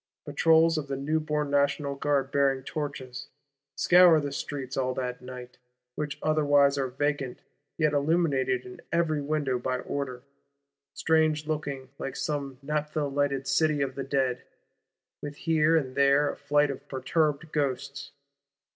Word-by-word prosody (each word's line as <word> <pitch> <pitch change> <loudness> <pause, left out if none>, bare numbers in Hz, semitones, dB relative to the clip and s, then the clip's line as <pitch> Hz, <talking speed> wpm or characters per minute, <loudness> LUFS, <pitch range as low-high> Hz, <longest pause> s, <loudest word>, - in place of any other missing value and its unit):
—Patrols 160 +2 +4
of 145 - -6
the 140 - -3
newborn 150 +1 -1
National 140 0 +1
Guard, 140 -1 0
bearing 135 -2 +2
torches, 140 -4 -5 0.5
scour 175 -3 +6
the 145 -1 -3
streets, 135 -1 -5
all 130 -1 -1
that 125 -1 -4
night; 125 -1 -10 0.3
which 150 +1 -4
otherwise 145 -2 +4
are 135 -1 -1
vacant, 140 0 -2 0.3
yet 155 -2 +2
illuminated 140 -4 +1
in 125 - -11
every 165 -3 +1
window 140 -3 -1
by 130 +1 -1
order. 130 -2 -5 0.7
Strange 155 -1 +2
looking; 140 -4 -4
like 135 - -4
some 140 -4 -3
naphtha 150 +1 -2
lighted 140 -1 -1
City 150 0 +2
of 135 -1 -3
the 135 - -4
Dead, 130 -2 0 0.8
with 145 0 -6
here 160 +1 +2
and 130 -5 -2
there 140 +1 +3
a - - -9
flight 145 0 +2
of 140 +1 -9
perturbed 150 +3 -1
Ghosts. 140 -1 -2
140 Hz, 140 wpm, -27 LUFS, 135-150 Hz, 0.8 s, scour